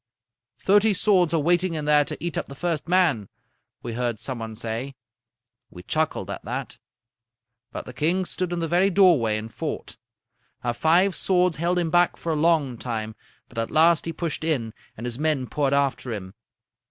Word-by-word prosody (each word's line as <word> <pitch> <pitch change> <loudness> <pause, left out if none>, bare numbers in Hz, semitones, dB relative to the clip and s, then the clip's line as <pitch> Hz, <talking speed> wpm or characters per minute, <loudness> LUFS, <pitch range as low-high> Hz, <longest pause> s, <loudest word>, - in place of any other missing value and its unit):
"'Thirty 205 +1 +3
swords 185 -4 +3
are 165 - +2
waiting 175 +2 +2
in 150 -1 -3
there 150 0 +5
to - - -6
eat 170 +1 -4
up - - -2
the 140 - -10
first 165 -1 -2
man,' 170 - +2 0.5
we 120 - -4
heard 120 -1 -1
some 130 +2 -5
one 110 -1 -6
say. 115 +4 -4 0.7
"We 90 - -12
chuckled 155 +9 -1
at - - -6
that. - - -5 0.9
"But - - -6
the 125 - -9
king 170 +7 +1
stood 180 0 -2
in 175 - -2
the 165 -1 -1
very 180 +4 +3
doorway 170 - +4
and 110 +1 -7
fought. - - -5 0.7
Our 120 - 0
five 170 +8 +3
swords 180 -3 +2
held 175 +3 0
him 170 -2 0
back 175 +1 +3
for 165 - -3
a - - 0
long 150 -6 +2
time, 110 -3 -4 0.3
but 120 - -6
at 115 - -2
last 165 +1 +4
he 165 - -2
pushed 165 -1 -4
in, 130 -9 -1 0.2
and 115 - -6
his 120 +1 -4
men 150 -4 +1
poured 140 +2 -1
after 140 -3 0
him. 95 -4 -6
155 Hz, 190 wpm, -24 LUFS, 120-175 Hz, 0.9 s, there